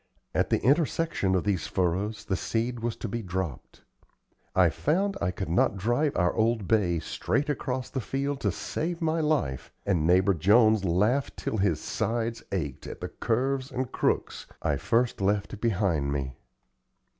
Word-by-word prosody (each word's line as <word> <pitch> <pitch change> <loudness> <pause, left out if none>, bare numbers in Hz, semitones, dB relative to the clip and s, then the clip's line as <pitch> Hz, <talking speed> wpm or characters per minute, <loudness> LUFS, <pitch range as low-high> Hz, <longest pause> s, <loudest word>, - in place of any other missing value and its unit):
At - - +1
the - - +2
intersection 145 - +2
of 90 - +1
these 100 -5 0
furrows 95 +4 -1
the 95 - 0
seed 115 +5 -2
was 115 0 -2
to - - -5
be 115 +3 -3
dropped. 95 - -5 0.7
I 90 -2 +6
found 195 - 0
I - - +1
could 95 +1 -4
not 90 +3 +2
drive 120 +9 +1
our 90 0 +2
old 110 -3 +1
bay 95 -6 +2
straight 140 - -1
across 130 -3 -2
the 130 - -2
field 140 +4 -2
to - - +1
save 170 +1 -3
my 165 0 0
life, 145 - 0
and 85 -6 +1
neighbor 95 +3 +4
Jones 110 +4 +4
laughed 105 +10 +1
till 110 - -2
his 95 -6 +1
sides 115 0 -2
ached 75 -9 -3
at - - -7
the - - -5
curves 130 +3 -1
and 130 -1 -3
crooks - - -1 0.2
I - - +1
first 115 -2 +1
left 100 +1 0
behind 90 -10 +1
me. 65 -2 -3
110 Hz, 165 wpm, -27 LUFS, 90-130 Hz, 0.7 s, I